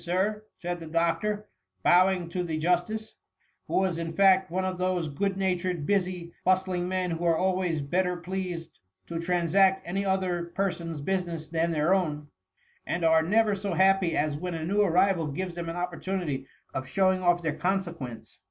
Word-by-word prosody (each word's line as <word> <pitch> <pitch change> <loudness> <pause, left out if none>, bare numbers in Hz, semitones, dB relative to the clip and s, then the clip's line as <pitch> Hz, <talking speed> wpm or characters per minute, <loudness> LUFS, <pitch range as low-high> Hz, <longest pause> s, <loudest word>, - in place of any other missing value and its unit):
Sir," 200 +5 -1
said 175 0 -4
the 165 - -8
doctor, 185 +6 0 0.4
bowing 180 0 +4
to 180 +1 -2
the 165 -3 -2
Justice; 180 +7 -1 0.5
who - - -3
was 185 -3 +1
in 165 -1 -4
fact 190 0 +5
one 185 +2 -1
of 185 -1 -3
those 180 -3 0
good 195 +7 -1
natured, 180 -4 -1
busy, 180 -3 -1
bust 185 +1 +3
ling 180 -1 -1
men, 185 -1 -1
who 165 +1 -3
are 165 -1 +3
always 180 -4 0
better 180 +4 0
pleased 175 -2 -5 0.3
to 165 -1 -4
trans 170 -1 -1
act 190 -1 +5
any 195 +3 -1
other 185 -3 0
person's 170 -5 -2
business 170 -2 -2
than 165 +1 0
their 160 +2 +2
own; 150 -6 -1 0.5
and 170 -1 -2
are 160 0 +5
never 210 +5 +3
so 200 -2 -2
happy 190 -2 +3
as 150 0 +1
when 180 0 -3
a 160 -1 -3
new 200 +4 +2
arrival 185 -3 +3
gives 180 +5 -4
them 170 -1 -5
an 165 - -4
opportunity 175 -5 -3 0.3
of 130 0 -4
showing 185 +5 +2
off 175 -1 +2
their 155 -2 0
consequence. 165 -7 -3
180 Hz, 180 wpm, -28 LUFS, 165-190 Hz, 0.5 s, fact